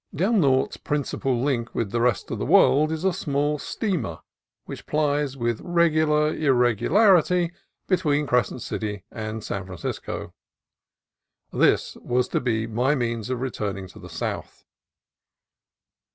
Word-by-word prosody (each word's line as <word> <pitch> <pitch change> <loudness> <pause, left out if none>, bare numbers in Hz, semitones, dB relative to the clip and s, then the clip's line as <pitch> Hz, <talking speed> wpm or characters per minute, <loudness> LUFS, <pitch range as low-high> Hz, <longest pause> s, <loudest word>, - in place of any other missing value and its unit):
Del 195 +9 +1
Norte's 135 -10 +2
principal 135 -3 -1
link 120 -4 -1
with 105 -4 -1
the 115 +1 0
rest 120 -3 0
of - - -3
the - - -2
world 155 +3 +5
is 160 +1 -3
a 190 -1 +2
small 145 -1 -1
steamer 175 - -2 0.5
which - - -9
plies 145 -2 0
with 120 -2 -1
regular 155 -3 +2
irregularity 165 - +3 0.4
between 150 -6 +1
Crescent 125 -1 0
City 105 -3 -4
and 110 -1 -5
San 100 - -4
Fran 90 -1 -8
cisco. - - -5 1.2
This - - +2
was 125 0 0
to - - 0
be 115 -3 0
my 125 +6 +1
means 115 -3 -2
of 125 -1 -2
returning 100 -7 -3
to - - -14
the - - -11
south. - - -5
135 Hz, 135 wpm, -24 LUFS, 115-155 Hz, 1.2 s, world